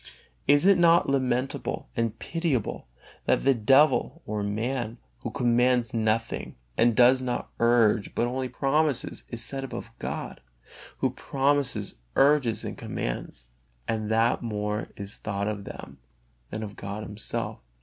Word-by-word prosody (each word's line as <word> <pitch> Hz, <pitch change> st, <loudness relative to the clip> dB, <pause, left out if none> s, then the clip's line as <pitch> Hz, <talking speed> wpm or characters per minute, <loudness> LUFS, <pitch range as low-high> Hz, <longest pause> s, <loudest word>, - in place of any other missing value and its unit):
Is 145 Hz, +4 st, +5 dB
it 195 Hz, -2 st, +6 dB
not 170 Hz, -3 st, +5 dB
lamentable 130 Hz, -, -1 dB
and 115 Hz, -2 st, -1 dB
pitiable 160 Hz, -, -2 dB, 0.4 s
that -, -, +2 dB
the 135 Hz, -, +5 dB
devil 135 Hz, +7 st, +3 dB
or 105 Hz, -1 st, -2 dB
man, 115 Hz, +3 st, -2 dB, 0.2 s
who -, -, -4 dB
commands 120 Hz, 0 st, +2 dB
nothing 115 Hz, 0 st, -1 dB, 0.2 s
and 115 Hz, 0 st, +3 dB
does 125 Hz, +2 st, +6 dB
not 125 Hz, -1 st, -3 dB
urge, 115 Hz, -3 st, +3 dB
but 120 Hz, -, +2 dB
only 130 Hz, +1 st, -2 dB
promises, 140 Hz, +2 st, 0 dB
is 120 Hz, -1 st, -1 dB
set 135 Hz, -1 st, -1 dB
above 135 Hz, -, -6 dB
God, -, -, -5 dB, 0.6 s
Who -, -, +2 dB
promises, 135 Hz, -, 0 dB, 0.2 s
urges 135 Hz, -5 st, +3 dB
and -, -, -5 dB
commands; -, -, -5 dB, 0.4 s
and 110 Hz, -1 st, -1 dB
that 115 Hz, +1 st, +2 dB
more 105 Hz, -2 st, -2 dB
is 100 Hz, 0 st, -7 dB
thought 100 Hz, -1 st, -3 dB
of 105 Hz, -2 st, -3 dB
them 70 Hz, 0 st, -9 dB, 0.5 s
than 110 Hz, +1 st, -4 dB
of 105 Hz, -1 st, -7 dB
God 100 Hz, +2 st, -5 dB
Himself? 105 Hz, 0 st, -4 dB
120 Hz, 140 wpm, -27 LUFS, 105-135 Hz, 0.6 s, it